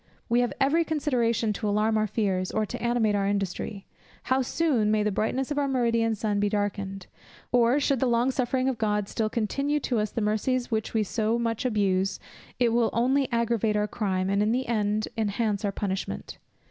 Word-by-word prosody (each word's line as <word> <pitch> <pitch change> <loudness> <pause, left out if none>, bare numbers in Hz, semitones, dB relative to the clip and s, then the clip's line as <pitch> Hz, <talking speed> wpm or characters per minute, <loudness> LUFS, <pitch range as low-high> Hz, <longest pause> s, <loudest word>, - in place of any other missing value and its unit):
We 235 +1 +3
have 245 -1 +1
every 300 +5 +3
consideration 240 -8 0
to 210 +1 -2
alarm 215 +2 +2
our 215 0 +2
fears, 190 -3 -1
or 215 0 0
to - - -6
animate 235 -3 +1
our 200 -1 +1
industry. 200 0 -3 0.4
How 260 +1 +1
soon 255 -5 +1
may 215 0 +2
the 210 - +1
brightness 250 +7 -1
of 290 - 0
our 285 - +1
meridian 230 -4 +1
sun 210 -1 -1
be 205 0 +2
darkened! 200 -2 -2 0.5
Or, 245 +2 +4
should 275 -2 +1
the 260 - +2
long 240 +2 +2
suffering 255 0 0
of 260 -3 -1
God 210 -2 0
still 220 0 -1
continue 275 +7 -1
to 245 -4 0
us 210 0 0
the - - -3
mercies 240 +4 0
which 220 0 -2
we 220 - +3
so 220 +3 0
much 230 +1 -2
abuse, 195 -4 +1 0.4
it 240 -2 +4
will 235 -1 +3
only 260 +4 +1
aggravate 230 -2 +1
our 210 0 +1
crime, 190 -5 -1
and 200 +1 +1
in 210 +1 +2
the 255 +2 0
end 215 -2 0
enhance 210 0 0
our 200 - 0
punishment. 195 -1 -4
220 Hz, 200 wpm, -26 LUFS, 210-245 Hz, 0.5 s, Or